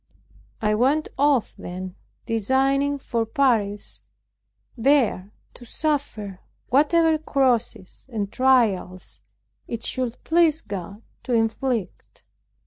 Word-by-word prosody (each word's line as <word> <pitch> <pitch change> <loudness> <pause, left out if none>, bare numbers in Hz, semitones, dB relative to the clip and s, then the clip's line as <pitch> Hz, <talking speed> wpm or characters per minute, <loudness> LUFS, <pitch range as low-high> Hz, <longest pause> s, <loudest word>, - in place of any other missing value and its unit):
I 210 0 +2
went 270 +8 +1
off 280 -4 +2
then, 185 -1 -6 0.3
designing 270 +5 +1
for 235 -4 -2
Paris, 220 -4 0 0.7
there 235 -6 +2 0.2
to - - -13
suffer 235 -8 -3 0.3
whatever 315 +4 +3
crosses 245 -8 -1
and 205 -3 -3
trials 225 -9 +1 0.5
it 230 -1 -5
should 250 -2 -2
please 325 -1 +3
God 200 - -7 0.2
to 255 - -3
inflict. 225 -2 -2
240 Hz, 95 wpm, -23 LUFS, 210-275 Hz, 0.7 s, whatever